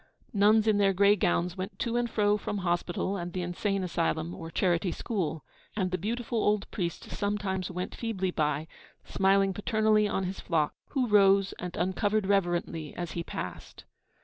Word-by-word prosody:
Nuns 210 +1 +5
in 210 -2 +4
their 195 -1 +4
grey 200 +2 +5
gowns 175 -2 0
went 190 +2 -5
to 235 -1 -2
and 240 0 +1
fro 210 -2 +2
from 210 0 -3
hospital 175 +3 -1
and 175 -1 -5
the 185 - -2
insane 195 +3 -1
asylum 170 -1 -1
or 165 -1 -7
charity 175 0 +1
school; 165 -10 -3 0.3
and 185 -4 0
the 185 - 0
beautiful 235 +2 -2
old 210 -1 +2
priest 170 -4 -4
sometimes 200 -2 -2
went 180 0 -4
feebly 195 -6 -2
by, 150 -1 -1 0.4
smiling 195 0 +2
paternally 215 +1 +2
on 195 -2 -1
his 185 +1 -4
flock, 155 -4 0
who 265 -3 0
rose 195 -2 +5
and 180 -1 -5
uncovered 200 +4 +1
reverently 175 -5 0
as 175 -2 -4
he 170 - -3
passed. 90 - -7
190 Hz, 170 wpm, -29 LUFS, 175-210 Hz, 0.4 s, Nuns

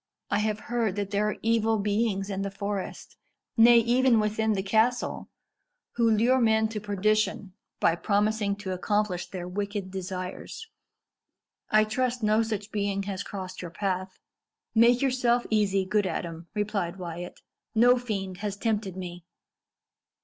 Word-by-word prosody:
I 205 - +2
have 215 0 -1
heard 230 -5 -1
that 200 -1 -3
there 210 +1 +1
are - - -3
evil 225 -1 +2
beings 205 -1 0
in 195 0 -2
the 200 - -2
forest 200 0 -5 0.4
nay, 235 +1 +7
even 240 +1 +4
within 215 +1 +1
the 190 -2 -1
castle 225 +5 +1 0.6
who 230 -1 +2
lure 235 +4 +3
men 220 -1 +3
to 220 -1 -4
perdition 205 -1 0 0.3
by 165 - +4
promising 205 +1 +1
to 200 -2 -6
accomplish 185 0 -1
their 180 -2 -6
wicked 200 0 -4
desires. 185 - -6 1.0
I 215 0 +5
trust 245 +2 -1
no 215 +1 +4
such 220 -2 -3
being 200 -1 -1
has 195 -1 -4
crossed 185 -2 -6
your 175 - -6
path." 185 +1 -3 0.6
"Make 235 +3 +5
yourself 245 -2 +2
easy, 195 -3 +2
good 205 +1 +1
Adam," 165 -1 -5
replied 205 -4 -1
Wyat; 175 -1 -7 0.4
"no 245 +2 +5
fiend 195 -6 -4
has 205 0 -4
tempted 205 -4 -1
me." 175 -2 -7
205 Hz, 145 wpm, -27 LUFS, 190-220 Hz, 1.0 s, nay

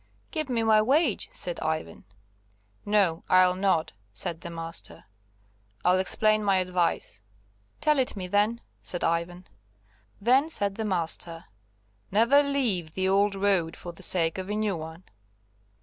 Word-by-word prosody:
"Give 310 -4 -3
me 235 -2 0
my 220 -1 +4
wage," 265 - +1
said 175 - 0
Ivan. 155 - -4 0.8
"No, 200 -6 +2
I'll 185 0 +5
not," 185 -4 0 0.2
said 165 +10 -3
the 170 - -7
master; 165 - -7 0.8
"I'll 180 +1 +4
explain 215 +3 +2
my 195 -2 +2
advice." 180 - -1 0.6
"Tell 300 -1 +3
it 255 - 0
me, 190 -2 -5
then," 205 +5 +1 0.2
said 175 - -1
Ivan. 170 +2 -2 0.7
Then, 260 +8 +3
said 200 -10 +1
the 220 +2 -4
master, 170 -3 -1 0.6
"Never 235 +8 +4
leave 235 - -1
the 190 0 0
old 200 +1 +2
road 190 -4 +1
for 175 - -8
the 170 - -14
sake 165 -1 +3
of 190 +1 -6
a 210 - -2
new 215 -2 -1
one." 160 +2 -9
190 Hz, 145 wpm, -26 LUFS, 170-215 Hz, 0.8 s, I'll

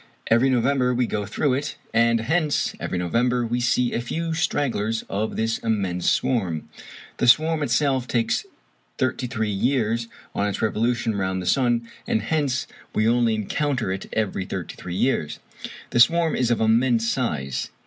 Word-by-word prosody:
Every 120 +4 +5
November 125 0 +2
we 125 0 +2
go 105 -3 -3
through 130 +5 0
it, 140 +3 -2 0.2
and 115 0 +3
hence 150 +4 0
every 90 - -3
November 120 +8 +1
we 120 +2 -1
see 125 0 +1
a 120 - 0
few 165 +7 -3
stragglers 120 -9 0
of 105 +3 -2
this 115 +1 0
immense 95 -6 0
swarm. 95 - 0 0.5
The 125 - +1
swarm 155 +5 +4
itself 130 -1 +1
takes 115 -2 0 0.5
thirty 130 0 -1
three 110 -4 -2
years 115 +1 0 0.3
on 100 - 0
its 100 - -3
revolution 115 +1 0
round 95 -1 -1
the 90 - -5
sun, 120 0 +2 0.2
and 110 - 0
hence 140 -1 0 0.3
we 110 +1 +2
only 115 -1 +3
encounter 120 +1 -1
it 95 0 -5
every 100 -3 -1
thirty 95 -3 -5
three 90 -1 -7
years. 95 - 0 0.5
The 120 - +1
swarm 165 +5 +4
is 125 -2 +1
of 120 - +1
immense 115 +1 +3
size. 75 - -2
115 Hz, 160 wpm, -23 LUFS, 110-130 Hz, 0.5 s, Every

